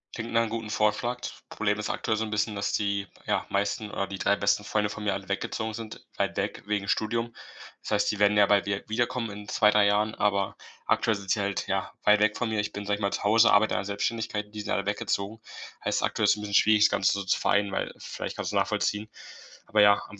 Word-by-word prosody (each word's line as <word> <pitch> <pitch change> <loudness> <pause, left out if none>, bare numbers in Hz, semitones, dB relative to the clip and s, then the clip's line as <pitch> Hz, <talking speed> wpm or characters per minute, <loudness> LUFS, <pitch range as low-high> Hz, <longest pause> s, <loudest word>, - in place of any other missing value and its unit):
Klingt 115 0 -5
nach 115 - +3
'nem 115 - -1
guten 115 -1 -4
Vorschlag. 105 +4 0
T - - -4 0.2
Problem 105 0 -1
ist 105 - -3
aktuell 110 - -1
so 110 - -1
'n 110 - -4
bisschen, 105 0 0
dass 100 - -2
die, 100 -1 -1 0.2
ja, - - 0
meisten 100 +2 -1
oder 100 - -2
die 95 0 -7
3 100 - +3
besten 100 +1 +1
Freunde 105 0 0
von 105 - -7
mir 100 - +1
alle 100 -1 -7
weggezogen 110 +2 -3
sind, 110 0 -8
weit - - -1
weg, - - -2
wegen 105 -1 -1
Studium. 115 +3 -1 0.5
Das - - -8
heißt, 105 -1 +2
die 105 - -5
werden 105 0 +4
ja 100 - +7
bald 100 0 +3
wieder 100 0 -1
wiederkommen 120 0 -1
in 105 0 -9
2, 105 -1 +4
3 105 -1 +4
Jahren, 105 +1 +2
aber 100 -2 0 0.3
aktuell 110 - +2
sind 100 -2 -5
sie - - +2
halt, 100 0 -1
ja, 95 -1 -1
weit 105 0 +5
weg 105 0 +2
von 125 - -1
mir. 110 -1 -1
Ich 105 - -2
bin, 105 - -5
sage 100 0 0
ich - - -10
mal, 100 0 0
zu - - -3
Hause, 110 +3 +5
arbeite 105 +1 +4
an - - +1
der 100 - -4
Selbstständigkeit 105 +1 -2
und 105 - -23
die 105 - -5
sind - - -7
alle 100 - 0
weggezogen. 100 +1 -2 0.4
Heißt, - - 0
aktuell - - 0
ist - - +4
'n - - -7
bisschen 105 -1 -6
schwierig, 105 +1 +5
das - - +6
Ganze 95 - +2
so 100 0 -2
zu 95 - +1
vereinen, 100 0 +2
weil - - -2
vielleicht - - -6
kannst - - -3
du's - - 0
nachvollziehen, 105 +1 -1 0.6
aber 105 -1 +3
ja, 100 0 +6
am 105 - -12
105 Hz, 260 wpm, -27 LUFS, 100-110 Hz, 0.6 s, ja